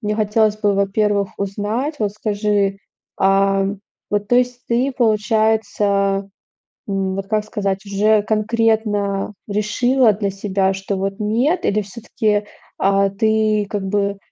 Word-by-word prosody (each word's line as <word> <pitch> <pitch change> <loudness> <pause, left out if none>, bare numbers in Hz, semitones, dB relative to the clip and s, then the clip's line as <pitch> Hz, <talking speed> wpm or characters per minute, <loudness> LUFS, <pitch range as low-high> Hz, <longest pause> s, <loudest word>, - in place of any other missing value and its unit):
мне 210 -2 -1
хотелось 215 0 +2
бы, 205 -2 +1
во-первых, 200 0 +1
узнать. 210 +9 -2
Вот 205 -2 -1
скажи, 205 -2 0 0.4
а 195 0 +3 0.4
вот, 205 0 -1
то 245 - +4
есть 250 0 0
ты, 250 +3 +1
получается, 210 -3 +1 0.6
м, 195 -1 -1
вот, 195 0 -4
как 215 0 0
сказать, 195 -2 -3
уже 205 +1 +2
конкретно 215 -2 0
решила 220 +4 +2
для 200 -1 -2
себя, 195 -1 0
что 195 +1 -4
вот 195 +2 -3
нет, 240 - +1
или 210 +1 +1
всё-таки, 210 0 -2 0.3
а, 195 0 +3
ты, 215 0 +1
как 205 -2 -3
бы, 200 0 0
205 Hz, 130 wpm, -19 LUFS, 195-220 Hz, 0.6 s, то